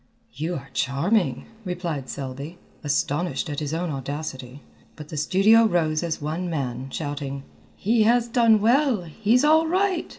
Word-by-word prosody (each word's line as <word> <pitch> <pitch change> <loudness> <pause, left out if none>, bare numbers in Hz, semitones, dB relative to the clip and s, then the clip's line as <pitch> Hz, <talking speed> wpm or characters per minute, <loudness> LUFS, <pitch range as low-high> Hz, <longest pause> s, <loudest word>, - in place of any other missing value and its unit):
"You 160 +7 -3
are 135 -2 -8
charming," 165 +10 0 0.2
replied 175 -7 -4
Selby, 140 +5 -6 0.3
astonished 150 +3 -1
at 145 - -3
his 150 -2 -3
own 165 +1 -2
audacity, 135 -1 -6 0.3
but 150 -1 -10
the - - -7
studio 195 +9 +4
rose 160 -6 +1
as 170 -2 -2
one 160 +4 -3
man, 130 -4 -3
shouting: 140 -2 -4 0.3
"He 225 +3 +1
has 235 +2 +3
done 230 -3 +4
well! 245 -2 +3
he's 220 - +1
all 315 +1 +5
right!" 370 0 0
165 Hz, 145 wpm, -24 LUFS, 145-220 Hz, 0.3 s, all